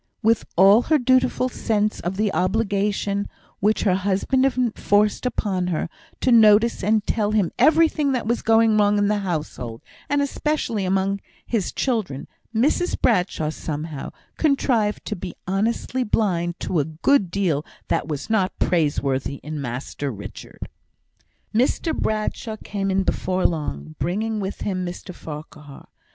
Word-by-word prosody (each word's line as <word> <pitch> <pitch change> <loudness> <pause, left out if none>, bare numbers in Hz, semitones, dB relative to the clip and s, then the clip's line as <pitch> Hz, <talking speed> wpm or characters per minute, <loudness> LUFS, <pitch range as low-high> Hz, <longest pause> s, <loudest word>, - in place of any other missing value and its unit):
With 225 0 +3
all 195 +5 +7
her 315 - +5
dutiful 255 -1 +2
sense 215 -3 -1
of 180 +2 -3
the 210 -1 +1
obligation, 200 0 0 0.3
which 210 +2 +2
her 195 - +3
husband 200 +7 +1
enforced 225 -3 +1
upon 190 -7 -1
her, 170 -1 -2 0.3
to 255 - +2
notice 220 -1 +5
and 215 +1 +2
tell 215 -2 0
him 205 -5 +2
everything 310 -2 +4
that 250 -4 -1
was 235 +2 0
going 225 -1 +4
wrong 205 0 +3
in 205 0 +2
the 210 -1 +1
household, 150 - -4 0.3
and 285 -1 +2
especially 280 -7 -1
among 195 +1 0 0.3
his 220 -6 -1
children, 215 - -2 0.2
Mrs 280 +10 +1
Bradshaw, 180 -7 +1
somehow, 155 -2 -5 0.3
contrived 250 -8 +1
to 210 - -3
be 180 -2 -7
honestly 225 +6 -1
blind 175 -6 0
to 175 - 0
a 145 - +1
good 175 - +2
deal 170 -6 0 0.3
that - - 0
was 150 -3 -4
not 200 -4 0
praiseworthy 140 -5 0
in 150 0 -5
Master 135 +3 -4
Richard. 100 -5 -8 0.9
Mr 265 +7 +1
Bradshaw 215 +1 -2
came 195 -1 -2
in 190 0 +2
before 185 0 -1
long, 80 - -2
bringing 215 +5 -1
with 195 0 -5
him 185 -3 -2
Mr 180 +1 -6
Farquhar. 150 -3 -10
200 Hz, 140 wpm, -23 LUFS, 175-225 Hz, 0.9 s, all